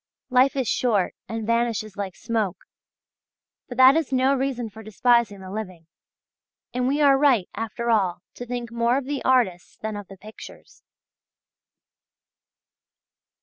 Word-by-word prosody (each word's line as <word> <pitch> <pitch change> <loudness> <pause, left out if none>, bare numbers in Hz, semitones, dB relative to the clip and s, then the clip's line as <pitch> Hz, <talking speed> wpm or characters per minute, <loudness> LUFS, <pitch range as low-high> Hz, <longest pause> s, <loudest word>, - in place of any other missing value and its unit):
Life 260 +2 +4
is 260 -4 -1
short 210 -7 +1 0.2
and 225 -1 -4
vanishes 230 -3 -1
like 195 -2 -5
smoke! 215 -5 -2 1.1
But 245 - -7
that 260 +2 +8
is 320 -5 0
no 260 +1 +3
reason 260 -3 -2
for 220 +1 -12
despising 220 -1 +1
the 190 0 -9
living. 185 -6 -6 0.9
And 250 0 0
we 285 +3 +1
are 275 -2 +5
right 260 -10 +3
after 235 +1 -3
all 185 -5 +1
to 245 - -8
think 240 -1 -5
more 235 +2 +1
of 275 - -3
the 285 0 -3
artists 230 -9 +1
than 220 -1 -5
of 205 -2 -7
the 195 - -12
pictures. 215 +4 -13
235 Hz, 145 wpm, -24 LUFS, 205-255 Hz, 1.1 s, that